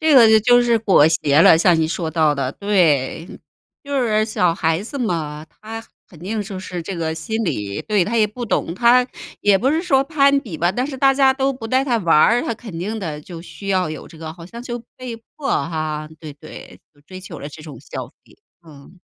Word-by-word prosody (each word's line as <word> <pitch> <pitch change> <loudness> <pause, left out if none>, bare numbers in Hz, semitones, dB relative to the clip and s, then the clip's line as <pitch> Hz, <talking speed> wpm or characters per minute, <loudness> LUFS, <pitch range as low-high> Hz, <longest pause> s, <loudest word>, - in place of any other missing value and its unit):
这 315 -1 +3
个 235 -5 +8
就 220 - +6
就 245 +2 +5
是 235 -1 +3
裹 195 -9 +4
挟 150 -2 +3
了。 165 - +7
像 170 0 +3
你 160 - +2
说 165 0 -3
到 155 -2 +2
的 135 -2 -2
对， 165 -7 +1 0.6
就 280 -2 -1
是 215 -2 +1
小 180 -6 +1
孩 165 0 0
子 275 +6 -7
嘛， 160 -8 -3
她 225 +1 -9 0.3
肯 165 - -16
定 210 +5 -3
就 195 -2 -7
是 180 -2 -6
这 180 +2 -6
个 160 -1 -2
心 220 +8 -3
理。 100 - -3
对， 205 -4 +1
她 230 +5 -2
也 215 -1 +4
不 240 +4 -7
懂， 175 -6 -1
她 245 +3 +4 0.3
也 205 -1 +4
不 260 +8 +1
是 320 +2 +1
说 275 -7 +2
攀 280 -2 +3
比 180 - -8
吧， 175 +2 +1
但 250 +5 -1
是 275 -2 -5
大 270 0 +4
家 270 -1 +4
都 270 0 0
不 255 -3 -10
带 260 +2 +2
她 245 -4 +1
玩 170 -5 +1
儿， 235 +9 +4
她 - - -2
肯 215 -6 -9
定 210 +6 -4
的， 155 -6 -5
就 165 +1 -10
需 200 +3 -10
要 185 -3 +1
有 155 - -8
这 160 - -15
个， 160 -1 -7
好 170 0 -12
像 230 +7 -10
就 240 -1 -5 0.2
被 255 -2 -7 0.2
迫 280 -2 -4
哈， 155 -2 -2
对， 155 -2 -9
对。 150 +2 -13
就 145 - -26
追 185 +4 -11
求 190 - -9
了 145 - -7
这 155 +1 -12
种 145 -6 -10
消 - - -7
费， - - -25 0.3
嗯。 150 +4 -16
190 Hz, 250 characters per minute, -20 LUFS, 160-240 Hz, 0.6 s, 个